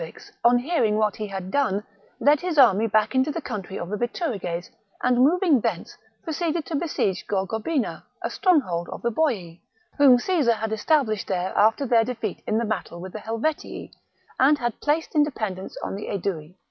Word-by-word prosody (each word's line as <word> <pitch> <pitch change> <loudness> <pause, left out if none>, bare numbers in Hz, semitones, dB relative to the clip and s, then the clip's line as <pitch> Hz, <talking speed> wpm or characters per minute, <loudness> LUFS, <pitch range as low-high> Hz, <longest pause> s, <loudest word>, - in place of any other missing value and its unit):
Vercingetorix, 415 -4 -10
on 240 +1 +6
hearing 245 -5 +1
what 215 -2 +1
he 215 - -4
had 190 -1 -6
done, 230 -8 +1 0.4
led 290 +1 +4
his 355 -3 -3
army 225 -5 +6
back 215 +2 +2
into 260 +3 +2
the 320 - -2
country 205 - -6
of 170 - -5
the 210 - -2
Bituriges, 205 - -3 0.4
and 250 0 +3
moving 310 - +4
thence, 210 -7 -3 0.3
proceeded 325 0 -2
to 325 - -4
besiege 280 - -1
Gorgobina, 220 - -1 0.2
a - - -2
stronghold 250 - +1
of - - -8
the 235 - +1
Boii, 210 - -1 0.4
whom 270 -3 +8
Caesar 285 -4 +2
had 220 0 -3
established 220 -3 +1
there 185 -1 -2
after 220 +6 +3
their 230 -2 +4
defeat 225 -4 -4
in 215 - +1
the 230 - 0
battle 190 -5 -4
with 185 +1 -8
the 215 - -5
Helvetii, 230 +9 -3 0.5
and 285 +3 +5
had 240 -4 -3
placed 305 +2 0
in 300 - +4
dependence 215 -10 -4
on - - -3
the 205 - -6
Aedui. 180 -4 -4
230 Hz, 185 wpm, -24 LUFS, 200-290 Hz, 0.5 s, whom